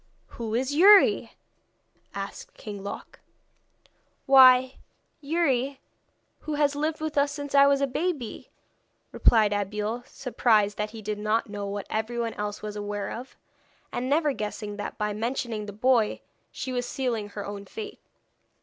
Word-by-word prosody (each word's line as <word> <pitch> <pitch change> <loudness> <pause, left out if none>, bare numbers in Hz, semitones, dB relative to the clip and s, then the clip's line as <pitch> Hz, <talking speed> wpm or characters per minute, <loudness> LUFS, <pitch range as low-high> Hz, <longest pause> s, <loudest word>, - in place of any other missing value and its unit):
'Who 225 -2 -4
is 260 +3 0
Youri?' 390 +6 +6 0.8
asked 200 0 -7
King 205 -2 -8
Loc. 200 - -8 1.1
'Why 260 -1 +7 0.4
Youri 280 -4 0 0.6
who 310 - -4
has 290 -1 +2
lived 310 +2 -2
with 310 -2 0
us 285 0 +2
since 285 -1 -6
I 280 0 +7
was 280 0 +3
a - - +4
baby,' 280 -3 -3 0.6
replied 215 -3 +4
Abeille; 210 +3 -2
surprised 220 -5 +1
that 210 0 -1
he 220 0 -10
did 210 0 -3
not 215 +1 0
know 205 -1 -4
what 200 0 -4
everyone 230 +1 -2
else 210 0 -5
was 210 -1 -5
aware 205 -1 -4
of, 245 +3 -8 0.6
and 255 +1 -3
never 295 0 +2
guessing 210 -2 -5
that 205 - -5
by 210 0 -1
mentioning 225 -1 -3
the - - -5
boy 230 +1 +2 0.3
she 260 0 -5
was 245 -1 -2
sealing 235 -6 -2
her 205 0 -6
own 200 0 -7
fate. 425 - -8
235 Hz, 150 wpm, -26 LUFS, 210-275 Hz, 1.1 s, Why